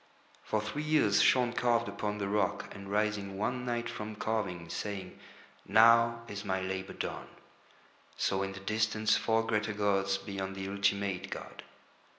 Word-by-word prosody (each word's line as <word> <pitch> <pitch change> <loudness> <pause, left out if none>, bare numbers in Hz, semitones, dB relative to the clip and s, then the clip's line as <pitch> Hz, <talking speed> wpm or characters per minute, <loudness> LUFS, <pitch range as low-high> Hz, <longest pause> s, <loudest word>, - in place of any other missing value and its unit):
For 110 - 0
three 105 +8 -4
years 150 -10 +3
Shaun 125 -2 +4
carved 120 -1 +2
upon 105 0 -3
the 100 -1 -2
rock, 100 0 -1
and 100 0 -9
rising 105 -2 0
one 125 +4 -1
night 120 -1 -1
from 110 -2 -6
carving, 100 -6 -2
saying: 95 0 -5 0.5
"Now 115 +2 +5
is 100 -2 -6
my 95 -2 -1
labour 95 0 -4
done," - - -5 0.9
saw 95 - +1
in 95 0 -2
the 100 - -8
distance 110 +1 +1
four 110 +2 +1
greater 105 -1 0
gods 100 -1 +1
beyond 95 -1 -5
the 95 0 -4
Ultimate 100 -1 0
god. - - -7
105 Hz, 155 wpm, -31 LUFS, 100-110 Hz, 0.9 s, Now